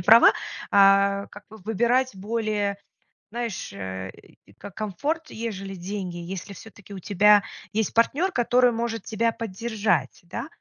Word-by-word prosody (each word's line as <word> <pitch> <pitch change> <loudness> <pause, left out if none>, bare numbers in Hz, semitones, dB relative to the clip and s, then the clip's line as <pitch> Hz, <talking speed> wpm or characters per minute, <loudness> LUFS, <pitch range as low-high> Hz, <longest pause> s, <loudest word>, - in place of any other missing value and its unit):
права, 220 +6 +8 0.4
а, 200 0 +5
как 205 0 -12
бы 220 - -12
выбирать 235 +4 +1
более, 210 -1 -1 0.5
знаешь, 230 - -4
э, 95 -1 -6 0.4
и - - -20
ко 200 - -11
комфорт, 285 - -3
ежели 195 -4 -5
деньги, 185 -1 -5
если 185 +3 -6
всё-таки 205 0 -13
у 190 - -6
тебя 205 +2 +5 0.3
есть 220 -2 0
партнер, 295 +11 +2
который 245 -1 +3
может 225 -2 -3
тебя 230 +1 0
поддержать, 210 - -1
да? 175 +10 -6
210 Hz, 135 wpm, -25 LUFS, 195-230 Hz, 0.5 s, права